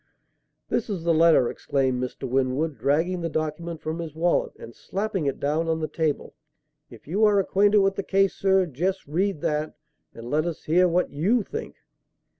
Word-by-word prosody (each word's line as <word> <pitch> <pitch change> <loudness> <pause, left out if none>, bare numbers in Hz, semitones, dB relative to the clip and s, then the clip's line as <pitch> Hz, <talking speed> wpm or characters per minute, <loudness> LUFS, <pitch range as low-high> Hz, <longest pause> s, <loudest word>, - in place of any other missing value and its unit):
"This - - -1
is 190 -5 -3
the 170 0 +2
letter," 160 -6 +5
exclaimed 130 -2 -1
Mr. 125 +1 -4
Winwood, 135 +4 0
dragging 170 +6 +1
the 165 - -2
document 155 +1 -4
from 160 +2 -3
his 160 -3 -6
wallet 170 +2 +1
and 115 - -11
slapping 195 - -3
it 140 - -2
down 155 +3 0
on 160 0 0
the 155 - -2
table. 155 -3 -2 0.6
"If 115 -1 -15
you 195 +8 0
are 210 -2 +5
acquainted 205 +2 +3
with 195 0 +2
the - - 0
case, 195 0 +2
sir, 190 -1 +2
just 180 +6 -2
read 175 +2 -1
that, 150 0 -1 0.4
and 115 0 -9
let 155 +3 +1
us 170 - -5
hear 180 +4 +3
what 175 +1 0
you 200 +11 +1
think." 450 - -7
165 Hz, 185 wpm, -25 LUFS, 150-190 Hz, 0.6 s, letter